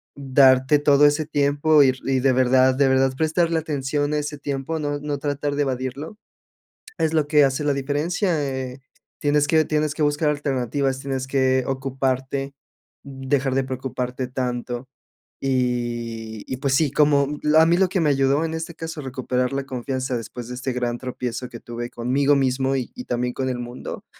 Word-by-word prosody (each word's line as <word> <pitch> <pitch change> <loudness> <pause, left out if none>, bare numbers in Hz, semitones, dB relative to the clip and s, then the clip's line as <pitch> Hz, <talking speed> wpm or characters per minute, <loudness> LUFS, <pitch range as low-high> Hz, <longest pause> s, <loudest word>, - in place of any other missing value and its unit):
darte 135 0 +4
todo 145 0 +5
ese 145 +1 +3
tiempo 145 0 +3
ir 130 -1 +2
y 135 -1 +1
de 135 0 +4
verdad 130 0 +4
de 140 0 +3
verdad 130 0 +3
prestarle 160 +1 +1
atención 145 -1 -2
a 150 - +1
ese 145 0 -4
tiempo, 140 +3 -3
no 145 -1 -2
no 145 0 -3
tratar 145 0 -2
de 145 - +1
evadirlo 135 - -4 0.8
es 160 0 +1
lo 155 -2 +1
que 150 -1 +5
hace 135 +2 0
la 145 -1 +2
diferencia, 155 +5 -1
eh, 130 -1 -5 0.4
tienes 145 0 +2
que 160 -1 +4
tienes 150 -1 0
que 155 - -2
buscar 150 +1 +2
alternativas, 135 -2 -1
tienes 135 -1 -3
que, 130 -1 +2
ocuparte, 135 +1 -2 0.5
dejar 135 -1 -1
de 135 - +2
preocuparte 130 -1 -4
tanto. 125 0 -4 0.5
Y 120 -4 -2
y 130 - -4
pues 135 -1 0
sí, 155 -2 +2
como, 145 -1 +4
mm, 150 +1 0
a 160 - +7
mí 170 +1 +3
lo 190 -1 +3
que 185 - -1
me 150 -3 +2
ayudó 135 +3 +2
en 160 - -3
este 160 +1 -5
caso 160 -1 -6
a - - -9
recuperar 125 0 -2
la 135 0 -2
confianza 130 0 -3
después 120 +1 -7
de 125 - -6
este 130 +1 -3
gran 120 -1 -2
tropiezo 125 -1 -5
que 115 - -9
tuve 120 0 -6
conmigo 135 +4 +1
mismo 135 0 +1
y 130 -2 -4
y 250 - -7
también 125 0 -1
con 130 -1 -2
el 125 -1 -2
mundo, 120 +1 -7
135 Hz, 185 wpm, -23 LUFS, 130-145 Hz, 0.8 s, a